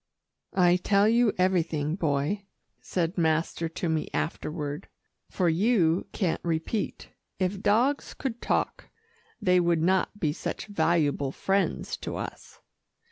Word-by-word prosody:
"I 180 -1 +5
tell 200 +2 +3
you 230 0 +4
everything, 165 -4 +1
Boy," 165 +4 -1 0.3
said 175 0 -1
master 165 0 +1
to 165 +2 -3
me 160 -1 -1
afterward, 150 -2 -3 0.4
"for 180 - 0
you 175 -1 +2
can't 185 -6 -1
repeat. 170 +6 -2 0.3
If 190 +1 -1
dogs 245 +8 +2
could 240 -4 -4
talk, - - -1 0.5
they 180 -4 +4
would 170 -2 +2
not 190 +3 +1
be 150 -5 +1
such - - -4
valuable 155 -9 +1
friends 195 +6 -1
to - - -5
us." - - -8
175 Hz, 125 wpm, -27 LUFS, 160-200 Hz, 0.5 s, I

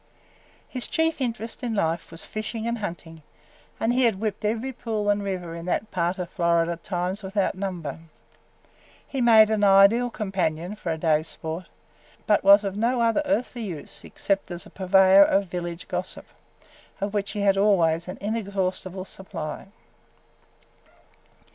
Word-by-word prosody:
His 255 -2 -2
chief 320 -3 0
interest 235 -1 -3
in 235 -3 -2
life 165 -4 -1
was 165 - -10
fishing 220 +1 -5
and 235 0 -2
hunting, 165 -5 -7 0.6
and 230 +2 +1
he 255 0 +3
had 220 -5 +1
whipped 215 -1 -3
every 230 +5 -1
pool 215 -4 -1
and 205 0 0
river 180 -4 -4
in 170 0 -7
that 210 +4 -1
part 175 +1 0
of 180 -2 -5
Florida 170 -1 +1
times 180 +3 -3
without 195 0 -1
number. 180 -7 -5 1.1
He 270 - -3
made 220 -2 +7
an 215 -1 +1
ideal 200 +5 +6
companion 185 -4 -2
for 180 -5 -4
a 160 - -2
day's 155 -1 +1
sport, 160 +2 -5 0.6
but 210 - +3
was 200 +1 +7
of 195 -1 -3
no 235 +4 +1
other 230 +5 +2
earthly 250 -4 -1
use 175 -9 -6
except 195 -1 -2
as 175 -1 -6
a - - -14
purveyor 190 0 +5
of 200 0 +2
village 175 -1 -5
gossip, - - -4 0.7
of 200 0 -3
which 205 -1 -2
he 205 - -3
had 200 -1 +4
always 175 -5 +3
an 185 - -6
inexhaustible 190 -3 -2
supply. 190 -4 -7
195 Hz, 155 wpm, -25 LUFS, 175-220 Hz, 1.1 s, made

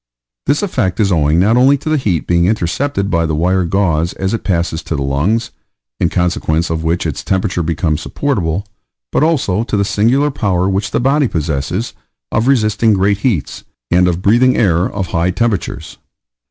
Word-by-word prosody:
This 145 +8 +1
effect 95 - -1
is 100 -2 +2
owing 80 -1 +2
not 110 +6 +3
only 135 +3 +5
to 145 - -11
the 155 - +2
heat 100 - -1
being 85 0 +2
intercepted 100 +2 -1
by 85 -1 +1
the 80 - -1
wire 90 +3 +1
gauze 85 -2 0
as 95 +1 -3
it 115 - -3
passes 85 -3 -1
to 80 - -4
the 70 - -2
lungs, 90 +13 0 0.5
in - - +2
consequence 85 -2 0
of 80 0 -2
which 85 +2 -1
its 75 -4 -3
temperature 95 -2 -1
becomes 80 -1 -1
supportable, 100 - -2 0.5
but - - +1
also 130 - +1
to 110 - -2
the 100 - +1
singular 125 +9 +2
power 95 -7 0
which 100 +1 -1
the - - -1
body 135 +3 +2
possesses 80 - -2 0.4
of 115 +3 0
resisting 110 -4 +2
great 100 +1 +1
heats, 105 - -2 0.3
and 90 +1 +4
of 90 +1 -1
breathing 120 +5 +4
air 90 -5 +2
of 95 -4 -4
high 85 0 +1
temperatures. 100 +1 -2
95 Hz, 180 wpm, -15 LUFS, 85-115 Hz, 0.5 s, only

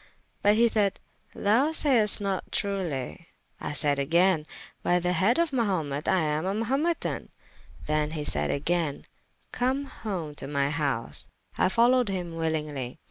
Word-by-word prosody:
But 205 +1 +4
he 235 +2 +5
sayde, 210 -3 +1 0.4
Thou 235 +9 +2
sayest 250 -10 +4
not 195 -2 -3
truely. 170 - -2 0.3
I - - -4
sayde 145 -1 +4
agayne, 165 +2 +2 0.3
by 175 - +2
the 180 0 0
head 190 +8 +3
of 335 -2 +1
Mahumet 175 - -1
I 190 -2 +3
am 155 +2 -1
a 195 - -1
Mahumetan. 270 +10 -1 0.6
Then 150 0 0
he 155 -1 -4
sayde - - -1
agayne, 155 0 -1 0.5
Come 260 +3 0
home 190 - -5
to - - -6
my 140 0 0
house, 140 -6 -2 0.3
I - - +2
folowed 240 +3 +3
hym 180 -3 -3
willingly. 155 -6 -3
180 Hz, 145 wpm, -27 LUFS, 150-220 Hz, 0.6 s, he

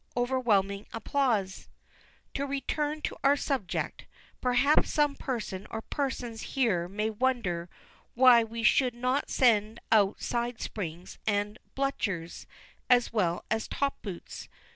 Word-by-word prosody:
(Overwhelming 215 -6 +1
applause.) 225 -6 -1 0.6
To 280 +1 -2
return 295 +2 -2
to - - -3
our 280 +1 +5
subject. 265 -11 -2 0.4
Perhaps 250 +4 +3
some 295 -2 +2
person 215 -8 -4
or 220 0 -5
persons 250 -5 -3 0.2
here 195 -10 +2
may 210 +4 -2
wonder 210 -8 -1 0.5
why 245 -2 +7
we 230 +1 -5
should 250 +2 +4
not 255 +3 0
send 225 -2 +3
out 205 -2 +4
side 240 -1 -2
springs 175 -3 -6
and 205 +1 0 0.2
bluchers, 200 -11 -2 0.4
as 245 -2 +4
well 175 -6 0
as 220 0 0
top 280 0 -2
boots. 190 -5 -8
230 Hz, 120 wpm, -29 LUFS, 205-260 Hz, 0.6 s, why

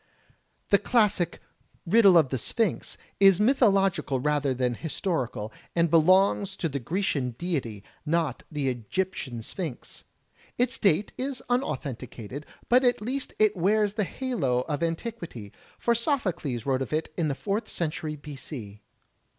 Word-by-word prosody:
The 200 - +5
classic 205 -6 +2 0.5
"Riddle 195 -1 +6
of 155 -5 +4
the 130 - -1
Sphinx" 225 - -1 0.2
is 195 -2 +6
mythological 195 - +3
rather 145 0 +1
than 125 -1 0
historical, 130 - -3 0.2
and 170 -2 +2
belongs 185 +4 +4
to 165 - -1
the 140 -2 -3
Grecian 140 - -1
deity, 130 - -3 0.2
not 160 -4 0
the 145 -3 -1
Egyptian 125 - -3
Sphinx. 160 - -6 0.5
Its 245 0 0
date 195 +1 +2
is 265 0 -3
imauthenticated, 140 - -3 0.2
but 250 +2 +5
at 245 -1 +3
least 255 +6 -4
it 215 -1 +4
wears 205 +3 +2
the 210 0 0
halo 175 - -1
of 145 +3 -3
antiquity, 165 - -4 0.3
for 235 - +2
Sophocles 195 - -1
wrote 135 -1 +1
of 130 - -4
it 155 0 -2
in 165 -3 0
the 140 - -1
Fourth 210 +7 -2
Century 155 -2 -3
b. 150 0 -9
c. 110 -7 -8
165 Hz, 140 wpm, -27 LUFS, 135-205 Hz, 0.5 s, Riddle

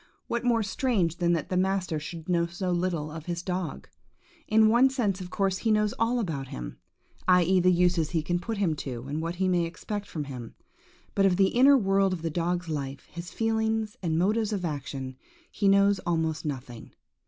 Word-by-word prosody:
What 235 0 -2
more 235 -2 +2
strange 200 - 0
than 175 -1 +2
that 165 -3 -2
the 185 - -1
master 185 -3 0
should 165 +1 -8
know 170 -2 +2
so 180 +2 -3
little 175 -4 -1
of 160 +1 -8
his 175 0 -3
dog? 180 -3 -4 0.6
In 220 0 +5
one 240 +4 +5
sense, 210 -8 -1
of 180 - -7
course, 195 0 0
he 225 - -1
knows 210 0 +2
all 235 +2 +2
about 155 - -3
him, - - -7 0.5
i.e., 180 0 +5
the 180 +1 +4
uses 175 -3 +2
he 165 -3 -1
can 175 +2 0
put 225 +4 -4
him 180 -6 +1
to, 125 -4 -5
and 150 +3 -3
what 165 +1 -3
he 190 +1 0
may 180 -2 +2
expect 205 +4 -5
from 155 -6 -4
him; 125 -5 -8 0.6
but 195 -1 +4
of 185 - +2
the 195 -1 +4
inner 275 +3 +6
world 195 -3 +2
of 170 -3 -5
the 165 - -1
dog's 175 +2 -1
life, 140 -3 -5
his 170 +1 -7
feelings 220 -1 -1
and 160 -3 0
motives 210 +5 +1
of 195 -4 -2
action, 135 -4 -5 0.3
he 200 - 0
knows 200 0 +4
almost 160 -3 -1
nothing. 125 -5 -6
180 Hz, 200 wpm, -27 LUFS, 160-200 Hz, 0.6 s, inner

